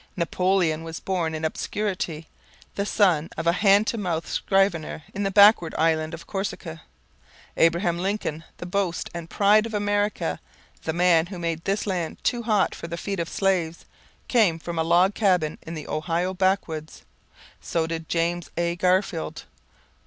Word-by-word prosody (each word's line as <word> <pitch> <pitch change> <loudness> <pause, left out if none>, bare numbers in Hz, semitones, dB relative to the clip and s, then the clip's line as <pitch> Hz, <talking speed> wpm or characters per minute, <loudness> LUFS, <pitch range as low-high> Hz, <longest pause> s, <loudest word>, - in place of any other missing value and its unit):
Napoleon 175 -2 +1
was 165 0 -6
born 170 -4 -2
in 155 0 -3
obscurity, 175 -2 -3 0.5
the 200 0 -2
son 175 -8 +2
of 165 - -3
a 170 - +5
hand 200 +3 +4
to 230 - -2
mouth 170 -5 -2
scrivener 195 -6 0
in 200 - -4
the 195 - +1
backward 200 -4 +6
island 160 0 +1
of 170 +1 -12
Corsica. 185 -4 -5 0.7
Abraham 170 +1 +2
Lincoln, 185 -5 -2
the - - -7
boast 180 -1 -2
and 170 -1 -7
pride 210 +2 +4
of 220 - -6
America, 205 - 0 0.5
the 160 - 0
man 170 -1 +4
who 185 0 -7
made 165 -1 -3
this 200 +1 0
land 180 -5 -2
too 240 -1 +1
hot 215 -6 +1
for - - -7
the 170 0 -5
feet 195 +1 -4
of 165 -1 -2
slaves, 180 -4 0 0.4
came 210 -10 +3
from 170 0 -5
a - - +2
log 175 +4 +4
cabin 180 -8 +1
in 165 - -7
the 155 - -7
Ohio 170 +4 -1
backwoods. 180 -5 -1 0.6
So 165 -1 -1
did 165 -1 -5
James 170 0 -1
A. 170 0 0
Garfield. 180 -3 0
175 Hz, 160 wpm, -25 LUFS, 165-195 Hz, 0.7 s, backward